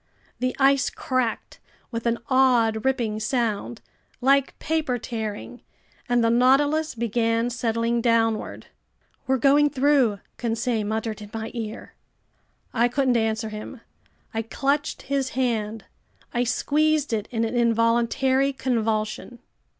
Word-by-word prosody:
The 255 0 -1
ice 275 0 +3
cracked 255 -3 -2 0.3
with 230 0 -3
an 235 0 +1
odd 245 -4 +3
ripping 235 -5 0
sound, 230 -1 -2 0.4
like 275 +2 +2
paper 310 -5 -1
tearing, 225 +1 -6 0.5
and 245 -1 +3
the 230 - +3
Nautilus 285 +5 +3
began 230 +1 0
settling 230 0 0
downward. 225 -2 0 0.6
"We're 265 0 +2
going 285 +3 +4
through!" 270 -7 +2 0.2
Conseil 230 -1 -1
muttered 220 0 -3
in 205 - -9
my 225 0 -5
ear. 225 -2 -6 0.8
I 235 0 +3
couldn't 255 0 +1
answer 220 -1 0
him. 215 +3 -8 0.5
I 225 - -1
clutched 280 +6 -1
his 275 -1 -1
hand. 225 -4 -1 0.5
I 240 0 +1
squeezed 300 +2 +1
it 210 -2 -1
in 230 -1 -1
an 225 - -3
involuntary 235 +3 +2
convulsion. 225 -2 -2
235 Hz, 120 wpm, -24 LUFS, 225-265 Hz, 0.8 s, going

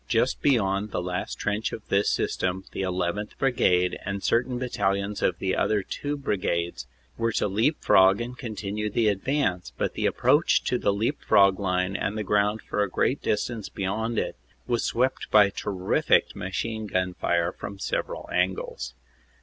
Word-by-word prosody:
Just 120 +2 +1
beyond 105 -6 +2
the - - -2
last 90 0 -3
trench 105 +1 -2
of 110 - -8
this 100 +1 +3
system 95 +1 -1
the 95 - -2
1 - - -1 0.2
1th. 105 +1 -6
Brigade 90 -9 +2
and 100 0 -4
cer 115 - +3
tain 125 0 -5
battalions 100 -5 -1
of 85 - +1
the 95 0 -1
other 105 -2 +1
two 145 +8 -4
brigades 85 - -2 0.3
were 115 0 +1
to - - +1
leap 110 +10 +1
frog 95 +1 +6
and 120 +1 -4
continue 105 -3 -4
the 110 0 +2
advance, 95 - -1
but - - -1
the - - 0
approach - - +3
to - - 0
the - - +2
leap 110 +8 -1
frog 100 -1 +4
line 90 -1 0
and 100 +2 -2
the 105 - -1
ground 105 +2 +1
for 105 - -2
a 100 - +1
great 130 +9 0
distance 110 0 -2
beyond 110 +4 -2
it - - -1 0.3
was 120 -2 0
swept 130 +3 0
by 105 -2 +6
terrific 95 -2 +1
machine 110 +4 -3
gun 95 -2 -1
fire 85 -1 0
from 100 +1 -8
several - - -3
angles. - - -1
105 Hz, 175 wpm, -26 LUFS, 95-115 Hz, 0.3 s, frog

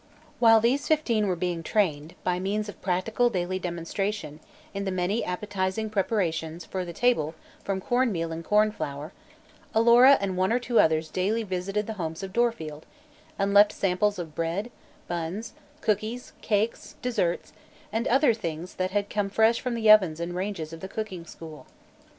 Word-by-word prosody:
While 225 -2 +7
these 250 +6 +1
fifteen 235 -9 +2
were 185 - +1
being 175 -1 -2
trained, 165 -5 0
by 180 -1 0
means 205 +3 -1
of 205 - -10
practical 205 +6 +1
daily 185 -3 -2
demonstration, 170 -1 -3 0.3
in 200 0 -3
the 195 - -2
many 185 +4 0
appetizing 195 +3 -2
preparations 175 -5 -1
for 185 -1 -3
the 175 - -6
table 170 -7 +1 0.3
from 195 -1 -2
corn 245 +2 +1
meal 165 -3 -2
and 165 +1 -5
corn 210 +3 +3
flour, 145 -3 -6 0.6
Alora 240 +4 +7
and 195 -2 -2
one 185 +2 +1
or 240 - +3
two 245 -1 +1
others 160 0 +3
daily 210 +5 0
visited 195 +2 -2
the 220 - -4
homes 165 +2 -4
of 190 -1 -6
Dorfield 165 -11 -1 0.5
and 200 0 0
left 205 +1 +7
samples 200 +2 +1
of 165 -4 -6
bread, 170 +9 -2 0.4
buns, 175 +6 -4 0.3
cookies, 220 +4 -2
cakes, 215 +2 -1
desserts 205 -9 -1 0.4
and 225 +1 0
other 265 0 +4
things 170 -5 -5
that 185 0 0
had 205 +1 -1
come 205 -1 -1
fresh 220 +3 +3
from 250 -2 -2
the 220 -2 +5
ovens 185 -7 +5
and 170 +1 -3
range 195 +1 -3
of 160 +1 -7
the 190 - -6
cooking 190 -6 -5
school. 160 -2 -11
195 Hz, 170 wpm, -27 LUFS, 175-220 Hz, 0.6 s, While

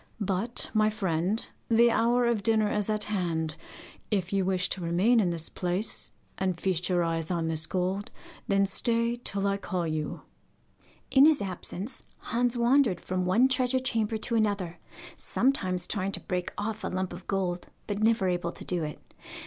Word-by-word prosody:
But, 200 +3 -1
my 215 -1 +4
friend, 190 0 0 0.2
the 235 +1 +5
hour 240 +2 +3
of 235 -3 +1
dinner 215 0 +2
is 210 0 -1
at 215 -1 +1
hand. 170 -6 -1 0.6
If 190 -3 -1
you 195 -1 +2
wish 185 0 +1
to 190 - -1
remain 180 +8 +3
in 190 -5 +2
this 165 -1 -2
place, 180 +4 -3 0.3
and 185 -3 -1
feast 180 -1 0
your 175 -1 +2
eyes 165 -1 -1
on 170 -3 -1
this 155 -1 +2
gold, 190 +2 -1 0.4
then 195 0 +3
stay 230 +4 +1
till 200 -5 -2
I 200 0 +1
call 185 -3 -2
you.' 155 -1 -3 0.9
In 270 +1 +7
his 310 -3 +4
absence 195 +3 -5 0.2
Hans 240 +1 0
wandered 240 -3 +3
from 185 0 -2
one 230 +8 +5
treasure 260 -1 +1
chamber 225 -4 0
to 225 - -2
another, 205 -6 0 0.4
sometimes 185 -9 +1
trying 195 0 -2
to - - +1
break 180 -1 -3
off 210 +1 -3
a - - -1
little 185 - -3
lump 185 -1 -2
of 175 +1 -10
gold, 180 -3 -1 0.2
but 205 0 -3
never 220 -3 +3
able 175 -1 -1
to - - -9
do 175 -3 0
it. 150 0 -5
195 Hz, 180 wpm, -28 LUFS, 180-225 Hz, 0.9 s, In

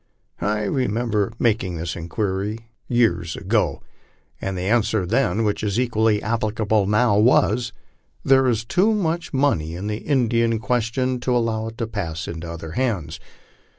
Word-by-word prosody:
I 105 +1 0
remember 115 -3 0
making 105 -7 0
this 85 0 -4
inquiry 100 +5 -3 0.2
years 85 -9 +1
ago, - - 0 0.6
and 95 -1 -3
the 90 - -3
answer 110 -1 +1
then, 115 0 +1
which 105 -1 -1
is 105 +1 0
equally 110 -3 +1
applicable 110 -2 0
now, 105 0 +3
was: 120 +1 +3 0.3
" - - -40
There 135 -1 +5
is 115 -2 0
too 205 - +2
much 170 -4 -1
money 130 - +1
in 95 +3 -5
the 105 0 -2
Indian 115 -3 +1
question 125 +2 -1
to 125 0 +1
allow 110 -2 -1
it 115 0 -8
to 115 - -1
pass 85 -7 -4
into 85 0 -6
other 80 -1 -7
hands." 90 - -2
110 Hz, 150 wpm, -22 LUFS, 95-120 Hz, 0.6 s, There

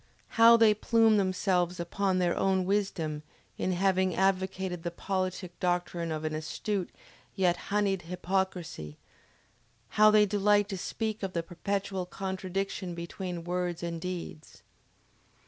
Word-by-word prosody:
How 230 0 +7
they 225 -2 +6
plume 225 +1 +3
themselves 185 -2 +1
upon 185 +2 0
their 180 -1 +1
own 190 -1 +1
wisdom 180 -6 -1 0.3
in 185 - -1
having 185 0 +2
advocated 190 -2 0
the 170 - -3
politic 185 0 -3
doctrine 175 -2 -1
of 155 0 -3
an 155 - -2
astute, 175 +5 -3 0.5
yet 180 -3 +3
honeyed 200 -2 +1
hypocrisy; 180 - -3 0.9
how 215 0 +6
they 210 0 +6
delight 205 0 +3
to 195 - -3
speak 220 +3 -3
of 190 -2 -3
the 170 - -1
perpetual 190 +1 -3
contradiction 190 -1 -4
between 170 0 -5
words 175 -1 -2
and 170 -1 -4
deeds!... 175 -4 -7
185 Hz, 130 wpm, -29 LUFS, 175-195 Hz, 0.9 s, How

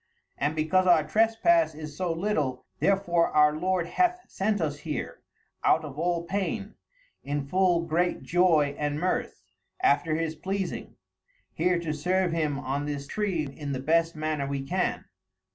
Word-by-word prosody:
And 145 +3 -1
because 160 +4 +2
our 170 -3 +6
trespasse 225 - +3
is 155 -1 -8
so 180 +1 -1
little, 155 -8 -1
therefore 175 -4 +2
our 150 0 +4
Lord 180 +1 0
hath 360 - +1
sent 205 +1 -1
us 150 -3 -2
here, 150 -1 -5 0.4
out 160 0 +3
of 145 0 -8
all 170 0 0
paine, 200 +3 -3 0.5
in 145 0 -2
full 180 +2 +2
great 175 +2 0
joy 165 -5 +3
and 145 -1 -1
mirthe, 180 +2 -2 0.4
after 175 - +2
his 160 0 -1
pleasing, 190 +3 -4 0.6
here 180 +2 +1
to 165 -3 -3
serve 180 +4 0
him 155 -4 0
on 140 +1 -3
this 145 -1 -4
tree 185 -1 -1
in 140 0 -6
the 130 - -3
best 165 +4 +2
manner 155 -2 -2
we 140 -1 -3
can. 135 - -1
165 Hz, 155 wpm, -27 LUFS, 150-185 Hz, 0.6 s, our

